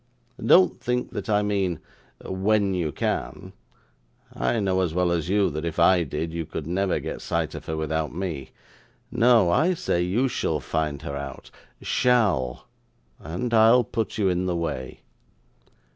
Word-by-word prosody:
Don't 90 -2 +5
think 125 0 -2
that - - -5
I 105 -1 +3
mean, 95 -5 -1 0.5
when 100 +1 +1
you 85 -4 -1
can - - -3 0.8
I 115 - 0
know 95 -2 +1
as 85 -3 -1
well 90 -1 +2
as 85 -1 -1
you 100 -2 +2
that 75 +2 -4
if 85 -1 -4
I 95 -2 +5
did, 80 +2 -4
you 85 0 -2
could 80 -1 -6
never 95 +3 0
get - - -6
sight - - -2
of - - -9
her 80 - -3
without 80 0 -2
me. 80 -6 -5 0.6
No. 120 -6 +4
I 175 - +3
say 85 - -1
you 100 +10 +1
shall 80 -10 -1
find 75 +2 -3
her 70 -3 -5
out 70 0 -7 0.3
SHALL 105 - +1 0.5
and 90 +11 -4
I'll 115 +2 +6
put 110 -2 -3
you 105 -3 +2
in 90 0 0
the 90 - 0
way. 75 -6 -4
90 Hz, 160 wpm, -25 LUFS, 80-105 Hz, 0.8 s, I'll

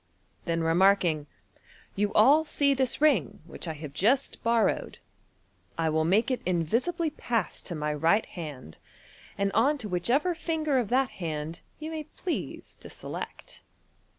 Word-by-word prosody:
Then 165 -1 0
remarking, 170 -3 +3 0.3
" - - -27
You 205 +1 0
all 280 +9 +6
see 285 -2 +2
this 260 0 0
ring, 245 - +3
which 170 - -8
I 160 - -2
have 150 -2 -8
just 230 - +1
borrowed. 230 -1 +1 0.8
I 165 -1 +1
will 155 0 +1
make 215 +9 +2
it 255 - -1
invisibly 230 - 0
pass 230 - -2
to 175 - -5
my 150 0 -1
right 165 +8 +2
hand, 145 - -9 0.6
and 200 0 0
on 270 +9 +3
to 235 -6 -6
whicheve 235 - +1
r 360 - +1
finger 315 -4 0
of 230 -5 -2
that 260 +1 +2
hand 160 0 -4 0.2
vou 310 +1 -5
may 310 -1 -5
please 340 +3 -5
to - - -11
select." - - -8
205 Hz, 155 wpm, -28 LUFS, 165-275 Hz, 0.8 s, all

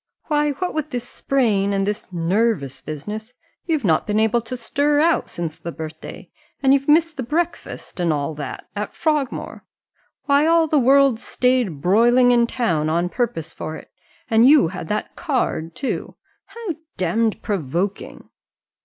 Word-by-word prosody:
Why, 295 -1 +2
what 360 +6 -3
with 310 -1 -2
this 245 -2 -4
sprain, 210 -7 +1
and 195 0 +1
this 205 -2 -4
nervous 175 - 0
business, 210 +10 -7 0.3
you've 315 -8 0
not 160 +1 +2
been 210 0 +1
able 220 +2 +2
to 235 +3 -6
stir 290 +5 +1
out 330 +2 +2
since 165 -2 -5
the 170 - -6
birthday, 160 -1 -9 0.3
and 270 0 +5
you've 275 0 +1
missed 320 0 +4
the - - -2
breakfast, 325 - -3
and 175 -2 +2
all 150 +1 -1
that, 145 -1 -7
at 210 +1 -4
Frogmore 300 -5 -2 0.6
why, 285 +2 +4
all 330 0 +4
the 305 -1 +2
world 270 -2 +4
stayed 250 - 0
broiling 240 - +4
in 235 -1 +4
town 170 -12 0
on 170 +2 0
purpose 230 - -2
for 155 - -6
it, - - -12 0.4
and 225 +2 +5
you 290 - +6
that 175 -3 -7
had - - -2
a - - -30
card 245 - -2
too 270 - -4 0.3
how 465 -3 -8 0.3
damned 215 +5 0
provoking!" 185 +1 -3
230 Hz, 160 wpm, -21 LUFS, 175-280 Hz, 0.6 s, you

